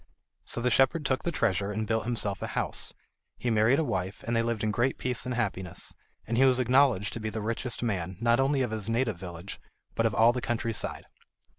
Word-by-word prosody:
So 120 Hz, -, -3 dB
the 125 Hz, +1 st, +1 dB
shepherd 135 Hz, +5 st, +3 dB
took 130 Hz, -1 st, +1 dB
the 170 Hz, -, -1 dB
treasure 105 Hz, -, 0 dB
and 110 Hz, +1 st, -2 dB
built 110 Hz, 0 st, 0 dB
himself 105 Hz, -5 st, -1 dB
a -, -, -2 dB
house. -, -, -2 dB, 0.4 s
He 120 Hz, -, -1 dB
married 110 Hz, +4 st, +4 dB
a 160 Hz, -, +2 dB
wife, 95 Hz, -6 st, -3 dB
and 120 Hz, -, -1 dB
they 115 Hz, -, +3 dB
lived 115 Hz, -2 st, -1 dB
in 110 Hz, -, +1 dB
great 120 Hz, +5 st, +1 dB
peace 125 Hz, -1 st, 0 dB
and 125 Hz, -, -2 dB
happiness, 95 Hz, -7 st, -3 dB, 0.3 s
and 115 Hz, -, -2 dB
he 130 Hz, -, +5 dB
was 130 Hz, -1 st, +5 dB
acknowledged 125 Hz, -5 st, +3 dB
to -, -, -4 dB
be 110 Hz, 0 st, -3 dB
the 110 Hz, +1 st, -4 dB
richest 115 Hz, +3 st, -2 dB
man, 95 Hz, -5 st, -2 dB
not 120 Hz, +2 st, +3 dB
only 135 Hz, 0 st, +2 dB
of 120 Hz, -, -2 dB
his 110 Hz, -1 st, -2 dB
native 115 Hz, -3 st, 0 dB
village, 90 Hz, +1 st, -8 dB, 0.3 s
but 115 Hz, -, +2 dB
of 110 Hz, -, -3 dB
all 115 Hz, +2 st, +6 dB
the 125 Hz, -, -3 dB
country 115 Hz, -1 st, -1 dB
side. -, -, -3 dB
115 Hz, 230 wpm, -28 LUFS, 105-125 Hz, 0.4 s, all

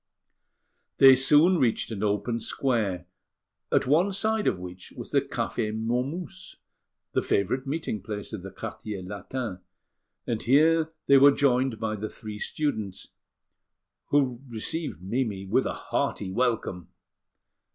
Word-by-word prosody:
They 135 Hz, -1 st, +9 dB
soon 150 Hz, +7 st, +6 dB
reached 120 Hz, -3 st, +1 dB
an 105 Hz, -3 st, -4 dB
open 105 Hz, +3 st, 0 dB
square, 105 Hz, -9 st, -1 dB, 0.7 s
at -, -, +3 dB
one 165 Hz, +9 st, +3 dB
side 215 Hz, +2 st, 0 dB
of 95 Hz, -, +2 dB
which 90 Hz, 0 st, -9 dB
was -, -, -8 dB
the -, -, +3 dB
Café 110 Hz, -1 st, -3 dB
Momus, 155 Hz, +11 st, -3 dB, 0.6 s
the -, -, +1 dB
favourite 130 Hz, +7 st, 0 dB
meeting 140 Hz, -, -3 dB
place 105 Hz, +1 st, -6 dB
of 105 Hz, -, -5 dB
the 95 Hz, -, -8 dB
Quartier 105 Hz, -1 st, -7 dB
Latin; 100 Hz, +2 st, -5 dB, 0.7 s
and 115 Hz, -2 st, -2 dB
here 160 Hz, +5 st, +4 dB
they 140 Hz, -1 st, +6 dB
were 140 Hz, +1 st, +8 dB
joined 130 Hz, -4 st, +2 dB
by 110 Hz, -1 st, -2 dB
the 105 Hz, +1 st, -5 dB
three 105 Hz, -1 st, -8 dB
students, 110 Hz, -12 st, -3 dB, 1.0 s
who 130 Hz, -4 st, +1 dB
received 115 Hz, -, -4 dB
Mimi 105 Hz, -2 st, -2 dB
with 95 Hz, -, +1 dB
a -, -, -2 dB
hearty 95 Hz, -2 st, -2 dB
welcome. 110 Hz, -6 st, -1 dB
120 Hz, 130 wpm, -27 LUFS, 105-140 Hz, 1.0 s, They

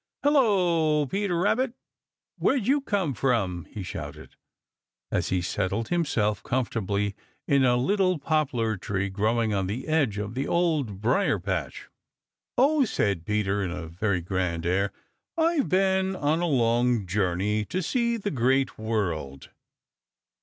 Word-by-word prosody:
"Hello, 180 Hz, -, +3 dB
Peter 195 Hz, +3 st, -1 dB
Rabbit! 230 Hz, +7 st, +1 dB, 0.7 s
Where'd 260 Hz, -6 st, +2 dB
you 280 Hz, +4 st, +3 dB
come 195 Hz, -, -1 dB
from?" 100 Hz, -, 0 dB
he 100 Hz, +6 st, -7 dB
shouted, 90 Hz, -, -8 dB, 0.8 s
as -, -, 0 dB
he 90 Hz, -1 st, 0 dB
settled 100 Hz, +5 st, -2 dB
himself 115 Hz, -, 0 dB
comfortably 105 Hz, -5 st, -1 dB, 0.3 s
in 140 Hz, -1 st, +4 dB
a 125 Hz, -1 st, +4 dB
little 185 Hz, +7 st, +2 dB
poplar 135 Hz, -8 st, 0 dB
tree 100 Hz, +1 st, -2 dB
growing 110 Hz, +2 st, +1 dB
on 95 Hz, -2 st, 0 dB
the 115 Hz, +7 st, -4 dB
edge 145 Hz, -10 st, +1 dB
of 105 Hz, +1 st, -4 dB
the 135 Hz, +3 st, -2 dB
Old 150 Hz, -, 0 dB
Briar 125 Hz, -, +2 dB
patch. -, -, -4 dB, 0.7 s
"Oh," 285 Hz, +3 st, +4 dB
said 100 Hz, -, -1 dB
Peter 105 Hz, -1 st, 0 dB
with 90 Hz, -3 st, -2 dB
a 80 Hz, -2 st, -7 dB
very 90 Hz, +2 st, -1 dB
grand 90 Hz, -2 st, -2 dB
air, 95 Hz, +3 st, +1 dB, 0.5 s
"I've 325 Hz, -3 st, +2 dB
been 190 Hz, 0 st, +2 dB
on 155 Hz, +1 st, 0 dB
a 175 Hz, -, +1 dB
long 120 Hz, -, +2 dB
journey 100 Hz, +3 st, 0 dB
to 185 Hz, -, -3 dB
see 235 Hz, +3 st, 0 dB
the 205 Hz, -2 st, -3 dB
Great 130 Hz, 0 st, +1 dB
World." 85 Hz, -12 st, -3 dB
120 Hz, 140 wpm, -26 LUFS, -, 0.8 s, in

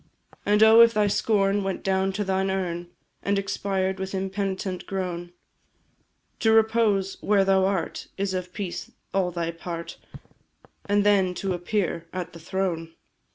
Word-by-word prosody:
And 210 Hz, +1 st, +5 dB
oh! 220 Hz, +1 st, +8 dB
if 230 Hz, -1 st, +6 dB
thy 210 Hz, -1 st, +3 dB
scorn 200 Hz, -1 st, +2 dB
went 195 Hz, 0 st, -3 dB
down 190 Hz, 0 st, +1 dB
to 205 Hz, +2 st, -1 dB
thine 190 Hz, 0 st, 0 dB
urn 175 Hz, -2 st, -2 dB, 0.3 s
And 200 Hz, 0 st, 0 dB
expired, 195 Hz, -1 st, -1 dB
with 190 Hz, 0 st, -4 dB
impenitent 190 Hz, -1 st, -3 dB
groan; 175 Hz, -2 st, -4 dB, 1.1 s
To 225 Hz, -, +3 dB
repose 220 Hz, -3 st, +2 dB
where 200 Hz, -1 st, +3 dB
thou 190 Hz, -1 st, +4 dB
art 190 Hz, -4 st, -2 dB
is 195 Hz, -1 st, -1 dB
of 180 Hz, -1 st, -3 dB
peace 190 Hz, -2 st, -5 dB, 0.2 s
all 190 Hz, -2 st, +2 dB
thy 170 Hz, -1 st, -2 dB
part, 170 Hz, 0 st, -7 dB, 0.9 s
And 205 Hz, 0 st, +2 dB
then 195 Hz, -3 st, +3 dB
to 190 Hz, +1 st, -2 dB
appear 175 Hz, -2 st, -2 dB
at 185 Hz, -2 st, -5 dB
the 170 Hz, -, -10 dB
Throne! 165 Hz, -2 st, -3 dB
190 Hz, 150 wpm, -25 LUFS, 180-200 Hz, 1.1 s, oh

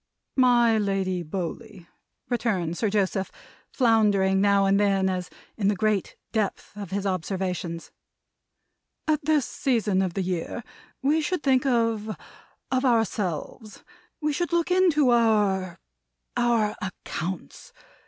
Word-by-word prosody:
"My 240 Hz, -3 st, +4 dB
Lady 195 Hz, -3 st, -1 dB
Bowley," 185 Hz, +4 st, -6 dB, 0.4 s
returned 200 Hz, -9 st, -1 dB
Sir 215 Hz, +3 st, 0 dB
Joseph, 195 Hz, -1 st, 0 dB, 0.4 s
floundering 205 Hz, -6 st, +3 dB
now 200 Hz, -1 st, +4 dB
and 195 Hz, +1 st, +3 dB
then, 195 Hz, -2 st, +2 dB
as 180 Hz, -1 st, -4 dB, 0.3 s
in 200 Hz, -3 st, +1 dB
the 205 Hz, -, +2 dB
great 210 Hz, -1 st, 0 dB, 0.2 s
depth 215 Hz, -2 st, -2 dB
of 200 Hz, -3 st, -7 dB
his 200 Hz, +1 st, -3 dB
observations, 185 Hz, -2 st, -3 dB, 1.2 s
"at 305 Hz, -1 st, +1 dB
this 300 Hz, -3 st, +2 dB
season 215 Hz, -7 st, 0 dB
of 185 Hz, -3 st, -2 dB
the 195 Hz, -, 0 dB
year 180 Hz, +5 st, -3 dB, 0.4 s
we 300 Hz, +4 st, +3 dB
should 335 Hz, +1 st, -2 dB
think 265 Hz, -1 st, +3 dB
of 230 Hz, -3 st, 0 dB, 0.5 s
of 260 Hz, 0 st, +1 dB
ourselves. 215 Hz, -, -1 dB, 0.4 s
We 300 Hz, -1 st, 0 dB
should 345 Hz, +4 st, -2 dB
look 340 Hz, +1 st, +1 dB
into 330 Hz, -8 st, +4 dB
our 210 Hz, -6 st, +2 dB, 0.6 s
our 235 Hz, -3 st, +2 dB
accounts. 185 Hz, -2 st, -6 dB
210 Hz, 125 wpm, -25 LUFS, 190-240 Hz, 1.2 s, My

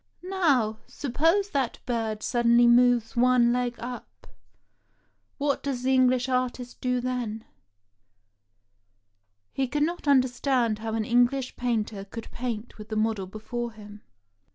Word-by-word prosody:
Now, 285 Hz, -, +1 dB
suppose 330 Hz, +9 st, 0 dB
that 270 Hz, -5 st, -1 dB
bird 225 Hz, -3 st, -2 dB
suddenly 240 Hz, 0 st, +4 dB
moves 240 Hz, -1 st, +4 dB
one 245 Hz, -1 st, +4 dB
leg 245 Hz, -1 st, -1 dB
up 245 Hz, +1 st, -9 dB, 0.5 s
— -, -, -44 dB
what 285 Hz, -1 st, 0 dB
does 265 Hz, -3 st, -3 dB
the 265 Hz, +1 st, +2 dB
English 255 Hz, -1 st, +3 dB
artist 250 Hz, -1 st, -2 dB
do 250 Hz, 0 st, 0 dB
then? 240 Hz, -3 st, -3 dB, 1.0 s
" 100 Hz, 0 st, -49 dB
He 270 Hz, -1 st, 0 dB
could 295 Hz, +3 st, 0 dB
not 340 Hz, 0 st, -3 dB
understand 255 Hz, -4 st, +2 dB
how 220 Hz, 0 st, -3 dB
an 220 Hz, -1 st, -1 dB
English 245 Hz, +2 st, +2 dB
painter 220 Hz, -4 st, -2 dB
could 225 Hz, +3 st, -9 dB
paint 235 Hz, -2 st, -5 dB
with 210 Hz, +1 st, -10 dB
the 215 Hz, -, -3 dB
model 215 Hz, -3 st, 0 dB
before 230 Hz, +4 st, -5 dB
him. 210 Hz, -1 st, -12 dB
240 Hz, 135 wpm, -26 LUFS, 215-255 Hz, 1.0 s, suddenly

